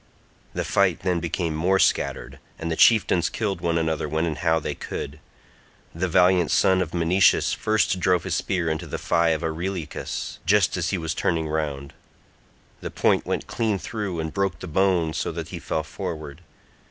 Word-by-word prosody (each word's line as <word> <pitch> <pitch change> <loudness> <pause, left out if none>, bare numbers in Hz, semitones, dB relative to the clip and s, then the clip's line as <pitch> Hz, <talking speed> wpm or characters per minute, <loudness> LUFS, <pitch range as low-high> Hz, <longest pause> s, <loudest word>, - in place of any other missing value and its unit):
The - - -1
fight 95 -4 +2
then 90 -2 0
became 85 0 -2
more 90 +5 +2
scattered, 65 -7 0 0.2
and 85 0 -4
the - - 0
chieftains 95 -6 +4
killed 100 -6 -2
one 85 -1 +1
another 80 -2 -1
when 80 +2 0
and 75 -2 -3
how 80 -1 +2
they - - -3
could. 75 +3 -6 0.7
The 90 +3 -1
valiant 90 0 +4
son 95 -1 +3
of 90 -3 -3
Menoetius 90 +3 +3
first 110 -3 +1
drove 90 -1 +2
his 95 - -3
spear 90 -1 -1
into 80 -1 -2
the - - -4
thigh 85 0 +2
of 80 -2 0
Areilycus 85 0 -4
just 100 -1 +3
as 85 -2 -1
he 95 - 0
was 80 -1 -2
turning 80 -2 0
round; 75 -3 -3 0.9
the - - -5
point - - +1
went - - -2
clean 110 -3 -1
through, 100 -3 -4
and 80 -1 -4
broke 95 -3 -1
the 95 - -8
bone 90 -2 +1
so - - -2
that - - -6
he - - -6
fell 80 - -2
forward. 80 -3 -6
85 Hz, 180 wpm, -24 LUFS, 80-95 Hz, 0.9 s, chieftains